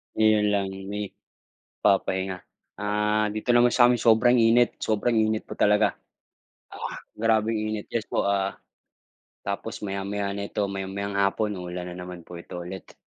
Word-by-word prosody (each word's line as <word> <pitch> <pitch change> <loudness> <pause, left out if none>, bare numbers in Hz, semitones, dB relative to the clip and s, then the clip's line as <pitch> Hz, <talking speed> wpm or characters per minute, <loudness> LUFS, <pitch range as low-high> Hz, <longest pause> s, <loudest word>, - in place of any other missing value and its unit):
'Yon 110 -1 +4
lang, 100 -1 0 0.2
may 105 0 -4 0.7
papahinga. 95 -1 +1 0.3
Ah, 105 +1 0
dito 120 +3 +1
naman 120 0 +5
sa'min, 120 -1 +5
sobrang 120 +2 +4
init, 115 +1 +4
sobrang 110 +2 +1
init 110 0 +1
pa - - -7
talaga, 105 0 +3 0.7
ah, - - -6 0.2
grabeng 110 0 +2
init 110 -1 -3
yes 115 -1 -2
po, 100 - -1
ah, 100 -1 0 0.9
tapos 100 +3 -4
maya-maya 100 0 -2
nito, 100 +1 -3
maya-mayang 100 +1 -4
hapon, 100 0 0
uulan 90 0 -6
na - - -8
naman 90 -1 -8
po 85 0 -10
ito 85 - -10
ulit. 95 +1 -9
105 Hz, 140 wpm, -26 LUFS, 95-110 Hz, 0.9 s, naman